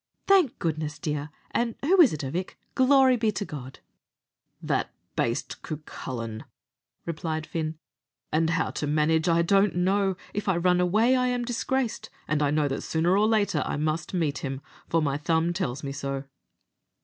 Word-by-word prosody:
"Thank 380 -10 +4
goodness, 155 -2 -2
dear! 150 -1 -3 0.2
an' 235 -1 0
who 360 +6 +6
is 285 - +7
it, 155 - -4
avick? 165 +7 -4 0.2
Glory 260 -1 +5
be 220 -2 +1
to 200 - -3
God!" 135 -5 -8 0.8
"That - - -1 0.3
baste, - - -2
Cucullin," 120 -7 -6 0.6
replied 160 -1 -3
Fin; 160 -1 -3 0.5
"and 160 +1 +2
how 165 -1 0
to 150 - -3
manage 160 +3 +2
I 170 0 +4
don't 195 +2 +3
know. 190 +1 +1 0.2
If 205 -1 -2
I 185 - +2
run 180 +1 +3
away, 215 +8 +3
I 250 0 +2
am 245 -1 -1
disgraced; 245 0 -2 0.2
and 155 -1 0
I 145 - +3
know 150 0 +2
that 135 - -2
sooner 170 +3 +1
or 210 +2 +4
later 205 -9 +2
I - - -3
must 155 +1 -1
meet 155 -5 0
him, 135 -1 -4 0.3
for 165 -1 +2
my 140 -1 0
thumb 165 +2 +1
tells 140 -8 -3
me 140 - -3
so." 140 -1 -4
165 Hz, 170 wpm, -27 LUFS, 150-205 Hz, 0.8 s, is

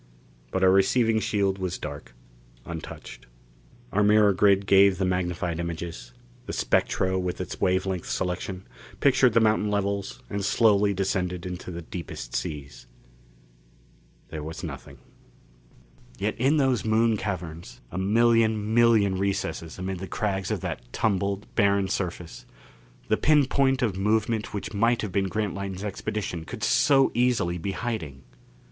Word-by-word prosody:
But 95 - -1
our 95 - +6
receiving 110 +4 +3
shield 100 -3 0
was 90 -1 -3
dark, 70 -5 -8 0.5
untouched. 85 -2 -8 0.6
Our 105 - +2
mirror 105 0 +5
grid 100 0 +3
gave 100 -1 +5
the 95 - 0
magnified 90 -2 -1
images; 85 -7 -5 0.4
the - - -4
spectro, 95 0 +1
with 90 -1 -3
its - - -6
wave 95 +1 +2
length 95 -3 -3
selection, 90 +1 -3 0.3
pictured 130 -3 +4
the 115 - +5
mountain 110 -1 +2
levels 100 -1 -2
and 100 -1 -3
slowly 105 -1 +3
descended 90 -2 -1
into 90 0 -6
the 85 -1 -6
deepest 80 -8 -7
seas. 70 -4 -5 1.4
There 80 -1 -6
was 80 +2 -7
nothing. - - -8 1.2
Yet 105 +2 -1
in 135 +5 +3
those 135 -4 +2
Moon 110 +1 +2
caverns 90 -5 -5
a 90 - -4
million 110 +1 +2
million 110 -5 +4
recesses 95 -5 -2
amid 95 0 -4
the 95 - -6
crags 95 -2 -2
of - - -2
that - - -4
tumbled, 100 0 -1
barren 100 -3 +2
surface 90 -3 -4 0.6
the 110 - +2
pin 150 -2 +4
point 135 -1 +1
of 105 -6 0
movement 110 +2 0
which 105 0 -5
might 115 +3 +2
have 105 - -3
been 95 +1 0
Grantline's 100 -1 -3
expedition 100 -3 -4
could 105 - -8
so 135 +4 +4
easily 120 -8 +1
be 95 +4 -3
hiding! 80 - -4
100 Hz, 140 wpm, -26 LUFS, 90-110 Hz, 1.4 s, our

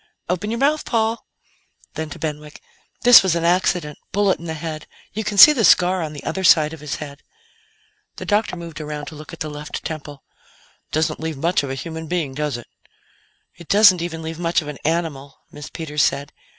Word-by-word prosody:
"Open 185 +4 -1
your 230 - -2
mouth, 295 +4 +1
Paul." 225 -1 -1 0.7
Then, 160 0 -5
to - - -8
Benwick: 150 -1 -6 0.4
"This 245 -1 +9
was 190 -3 +1
an 170 - -1
accident. 175 -3 +1
Bullet 200 -1 +1
in 170 - -10
the 160 -1 -4
head. 155 -1 -6 0.3
You 220 - -3
can 205 -1 -3
see 300 +10 +11
the 245 -6 0
scar 180 -1 +4
on 155 -2 -4
the 145 - -9
other 190 - -3
side 155 -3 +5
of 160 - -9
his 150 -1 -4
head." 145 -1 -9 0.9
The - - -7
doctor 210 -2 0
moved 165 -3 -8
around 150 -1 -5
to 155 - -12
look 150 0 -11
at 165 - -11
the 155 - -2
left 150 0 -7
temple. 145 -3 -7 0.7
"Doesn't 155 +1 0
leave 160 -2 -4
much 170 +6 +1
of 140 - -5
a 135 - -3
human 160 +3 -6
being, 160 -5 -2
does 150 -2 -2
it?" 120 - -11 0.9
"It 170 -2 -15
doesn't 200 -4 +6
even 165 -1 -5
leave 160 +1 -6
much 170 -1 +1
of - - -10
an 150 -2 -7
animal," 155 -4 -3
Miss 150 -1 -9
Peters 150 -2 -3
said. 140 +1 0
160 Hz, 205 wpm, -21 LUFS, 150-180 Hz, 0.9 s, see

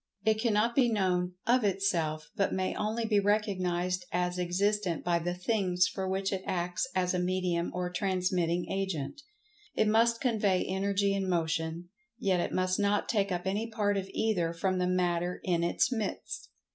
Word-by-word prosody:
It 220 0 +3
cannot 225 0 +2
be 245 -1 +4
known 180 -4 +1
"of 245 0 +3
itself," 175 -6 0
but 195 -3 +1
may 185 0 -1
only 220 +2 -1
be 215 -2 +3
recognized 185 -3 0
as 180 0 -1
existent 185 0 0
by 170 -1 +2
the 175 +1 -2
"things" 180 -2 +1
for 190 -1 -3
which 195 +1 -1
it 190 - -2
acts 180 +6 -1
as 180 -1 +1
a 180 - 0
medium 180 -1 0
or 180 0 -2
transmitting 180 -2 0
agent. 195 - -3 0.5
It 220 - +3
must 230 +2 +3
convey 210 -7 +1
Energy 200 +1 +1
and 195 -1 -1
Motion, 165 0 -1 0.3
yet 190 -5 +1
it - - -1
must 185 +1 0
not 205 0 +1
take 200 -3 +1
up 180 0 -2
any 210 +4 -1
part 210 -2 0
of 195 -1 -3
either 180 -7 0
from 185 +2 0
the 180 - +1
Matter 180 -1 0
in 170 -2 +1
its 175 +8 +1
midst. 220 -5 -4
185 Hz, 170 wpm, -30 LUFS, 180-205 Hz, 0.5 s, be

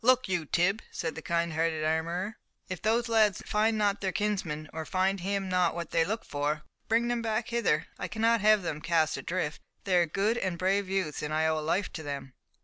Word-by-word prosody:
"Look 255 +1 +4
you, 180 -4 -1
Tib," 190 +7 +2
said 165 -1 -3
the - - -7
kind 170 -1 0
hearted 160 -1 0
armourer, 170 +6 -1 0.3
"if 185 -2 -5
those 230 +2 +2
lads 220 -3 +3
find 220 +1 +2
not 205 -1 +1
their 190 -1 0
kinsman, 180 -6 -2
or 160 0 -3
find 190 +4 +1
him 195 +1 -1
not 180 -2 +2
what 170 -1 -5
they 165 - +3
look 220 +6 -3
for, 150 +1 -2 0.2
bring 230 +2 +2
them 240 -1 0
back 220 0 -1
hither, 235 -10 +1
I - - -2
cannot 225 0 +2
have 215 -1 +5
them 155 -3 -3
cast 165 -2 +2
adrift. 170 -4 -3 0.2
They 190 -2 +1
are 175 -1 +4
good 205 +8 +1
and 185 -5 -2
brave 190 +2 +1
youths, 190 -6 -1
and 150 - -3
I 155 +1 +2
owe 160 0 +2
a - - -4
life 175 +6 0
to 160 - -5
them." 140 -3 -6
185 Hz, 220 wpm, -29 LUFS, 160-210 Hz, 0.3 s, have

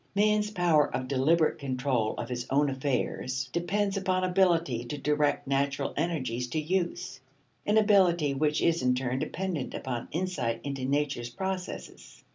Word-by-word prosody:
Man's 210 +1 +3
power 175 -7 +3
of 130 0 -3
deliberate 150 +5 +2
control 130 -4 -1
of 120 - -4
his 120 -1 -4
own 140 +1 +2
affairs 130 -1 -2
depends 195 +4 0
upon 185 -1 0
ability 170 -9 +2
to 135 +5 -5
direct 150 +1 +1
natural 140 0 0
energies 130 -7 -1
to 140 +6 -2
use: 175 +2 -2 0.5
an 210 +1 +4
ability 180 -8 +4
which 150 +2 +1
is 170 0 +2
in 125 0 +2
turn 130 0 -1
dependent 180 -5 -3
upon 120 -3 -4
insight 160 -9 -1
into 140 -2 -3
nature's 140 -3 -1
processes. 190 +8 -6
150 Hz, 145 wpm, -29 LUFS, 130-180 Hz, 0.5 s, an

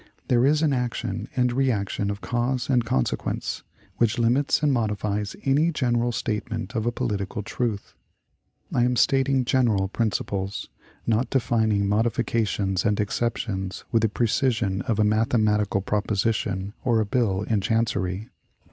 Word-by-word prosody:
There 125 +1 +4
is 150 +2 +3
an 150 -3 +3
action 125 -2 -2
and 125 -1 +2
reaction 105 -6 0
of 100 0 -4
cause 125 +2 -1
and 125 -2 +3
consequence, 65 - -1 0.4
which 115 +1 +2
limits 125 +6 +2
and 145 -2 +3
modifies 105 -3 -1
any 145 +5 +3
general 120 -5 +1
statement 110 +1 -3
of 110 0 -1
a - - +2
political 105 -4 -3
truth. 110 -2 -3 0.8
I 120 - +3
am 125 0 +2
stating 135 +1 +3
general 115 -7 +2
principles 100 -3 -2 0.4
not 115 +2 +1
defining 110 -6 +1
modifications 110 -3 0
and 105 -2 +1
exceptions 105 -3 -2
with 115 -2 +3
the 110 - +2
precision 110 -3 0
of 115 -5 +1
a 110 - +3
mathematical 105 -2 +2
proposition 105 -1 -1
or 120 -3 +2
a 110 - +1
bill 105 -4 0
in 105 -2 0
chancery. 110 -2 -1
115 Hz, 140 wpm, -25 LUFS, 105-125 Hz, 0.8 s, There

